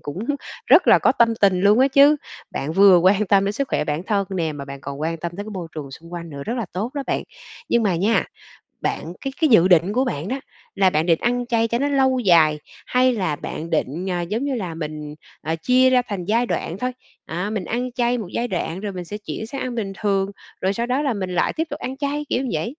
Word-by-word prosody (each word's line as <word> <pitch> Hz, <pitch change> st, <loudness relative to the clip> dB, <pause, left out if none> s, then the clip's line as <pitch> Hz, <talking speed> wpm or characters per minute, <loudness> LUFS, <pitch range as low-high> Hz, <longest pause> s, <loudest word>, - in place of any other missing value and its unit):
cũng 145 Hz, +4 st, -6 dB, 0.5 s
rất -, -, +6 dB
là -, -, +8 dB
có -, -, +3 dB
tâm 230 Hz, -1 st, +3 dB
tình 190 Hz, -3 st, +4 dB
luôn 205 Hz, +3 st, +5 dB
á 265 Hz, +2 st, +5 dB
chứ. 280 Hz, +2 st, +6 dB, 0.3 s
Bạn 145 Hz, +3 st, -3 dB
vừa 195 Hz, 0 st, +7 dB
quan 190 Hz, +4 st, +3 dB
tâm 195 Hz, +1 st, +4 dB
đến 200 Hz, -, 0 dB
sức 270 Hz, +5 st, -2 dB
khỏe -, -, 0 dB
bản 150 Hz, +2 st, -2 dB
thân 200 Hz, -2 st, +1 dB
nè, 170 Hz, -5 st, -1 dB
mà 140 Hz, -2 st, -7 dB
bạn 140 Hz, 0 st, -9 dB
còn 140 Hz, 0 st, -7 dB
quan 165 Hz, +2 st, -1 dB
tâm 170 Hz, +1 st, -5 dB
tới 205 Hz, -, -5 dB
cái 215 Hz, -, -8 dB
môi 185 Hz, -5 st, -6 dB
trường 145 Hz, -3 st, -6 dB
xung 165 Hz, +5 st, -12 dB
quanh 170 Hz, -1 st, -6 dB
nữa, 140 Hz, -1 st, -7 dB
rất 230 Hz, -, -2 dB
là 235 Hz, -4 st, -2 dB
tốt 210 Hz, +7 st, -3 dB
đó 285 Hz, -, -2 dB
bạn. -, -, -1 dB, 0.5 s
Nhưng 235 Hz, -, +3 dB
mà 195 Hz, -5 st, +1 dB
nha, 205 Hz, +7 st, +2 dB, 0.6 s
bạn 170 Hz, -, -3 dB
cái 270 Hz, -1 st, -4 dB
cái 315 Hz, -, +5 dB
dự 185 Hz, -7 st, +6 dB
định 180 Hz, +2 st, +4 dB
của 255 Hz, +3 st, +2 dB
bạn 170 Hz, -, -3 dB
đó 265 Hz, +5 st, -2 dB, 0.4 s
là 195 Hz, -1 st, +4 dB
bạn 155 Hz, -2 st, 0 dB
định 165 Hz, -2 st, +3 dB
ăn 245 Hz, 0 st, 0 dB
chay 230 Hz, -2 st, +1 dB
cho 235 Hz, +1 st, -1 dB
nó 280 Hz, -, +1 dB
lâu 265 Hz, -2 st, +2 dB
dài 165 Hz, -8 st, +4 dB, 0.3 s
hay 255 Hz, 0 st, +3 dB
là 185 Hz, -9 st, -1 dB
bạn 155 Hz, +3 st, -6 dB
định, 165 Hz, +3 st, -1 dB
à, 175 Hz, -1 st, -1 dB
giống 210 Hz, +9 st, -2 dB
như 280 Hz, -2 st, -1 dB
là 185 Hz, -8 st, -4 dB
mình, 150 Hz, -2 st, -6 dB, 0.3 s
à, 160 Hz, +1 st, -2 dB
chia 255 Hz, +10 st, +4 dB
ra 255 Hz, -1 st, +4 dB
thành 195 Hz, -4 st, -4 dB
giai 230 Hz, +5 st, +2 dB
đoạn 175 Hz, -6 st, -3 dB
thôi? 250 Hz, +4 st, -2 dB, 0.3 s
À, 180 Hz, +5 st, -3 dB
mình 210 Hz, -4 st, -3 dB
ăn 245 Hz, +5 st, -2 dB
chay 245 Hz, 0 st, 0 dB
một 220 Hz, -6 st, -5 dB
giai 240 Hz, -, -1 dB
đoạn 180 Hz, -3 st, -3 dB
rồi 205 Hz, 0 st, -4 dB
mình 180 Hz, -1 st, -6 dB
sẽ 205 Hz, +5 st, -6 dB
chuyển 210 Hz, +1 st, -6 dB
sang 275 Hz, +3 st, -6 dB
ăn 250 Hz, -2 st, -3 dB
bình 200 Hz, -4 st, -3 dB
thường, 195 Hz, -2 st, 0 dB, 0.3 s
rồi 190 Hz, +1 st, +1 dB
sau 235 Hz, +3 st, -2 dB
đó 255 Hz, +3 st, 0 dB
là 280 Hz, -4 st, 0 dB
mình 190 Hz, -3 st, -4 dB
lại -, -, +1 dB
tiếp 320 Hz, -, -1 dB
tục -, -, -6 dB
ăn 260 Hz, +1 st, -5 dB
chay, 290 Hz, +1 st, -2 dB
kiểu 245 Hz, -, +1 dB
như 260 Hz, -, -3 dB
vậy. 230 Hz, -, -2 dB
200 Hz, 265 wpm, -22 LUFS, 170-245 Hz, 0.6 s, là